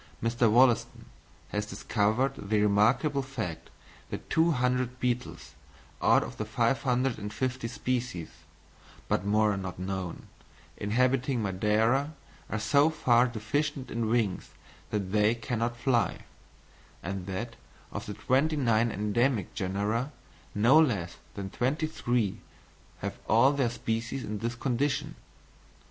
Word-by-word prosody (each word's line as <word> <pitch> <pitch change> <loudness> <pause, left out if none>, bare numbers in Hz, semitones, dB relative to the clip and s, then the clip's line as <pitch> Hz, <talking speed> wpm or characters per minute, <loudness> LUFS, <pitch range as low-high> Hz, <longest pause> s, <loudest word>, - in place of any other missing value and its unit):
Mr. 115 0 +2
Wollaston 120 +1 +3 0.4
has 105 0 -2
discovered 110 +6 0
the 105 -3 -1
remarkable 115 +8 +3
fact 130 -11 -5 0.4
that - - -7
200 125 -6 +1
beetles, 125 0 -3 0.5
out - - +5
of - - -8
the - - -2
550 125 +1 0
species 120 -7 -3 0.8
(but - - +1
more 105 0 +3
are - - -3
now 95 -1 -5
known) 95 -1 -4 0.5
inhabiting 125 +3 +1
Madeira, 110 +9 +1 0.3
are 110 - -1
so 140 +7 +4
far 125 -6 +3
deficient 130 +5 -2
in 115 -1 -1
wings 110 -5 0 0.4
that 100 -3 -2
they 105 +2 +3
cannot 115 +1 -2
fly; 120 -1 +1 0.8
and 95 0 -4
that, 115 +5 -4 0.4
of - - -6
the - - -5
twenty 145 +5 +1
nine 115 -4 +2
endemic 105 +1 0
genera, 105 +8 -1 0.4
no 120 +9 +6
less 100 - 0 0.2
than 95 -1 -5
twenty 140 +6 0
three 120 -9 -1 0.6
have - - -4
all 115 +6 +6
their 135 -4 +1
species 115 +2 -3
in 105 0 -4
this 115 +2 -2
condition! 135 +3 -1
115 Hz, 120 wpm, -29 LUFS, 105-130 Hz, 0.8 s, no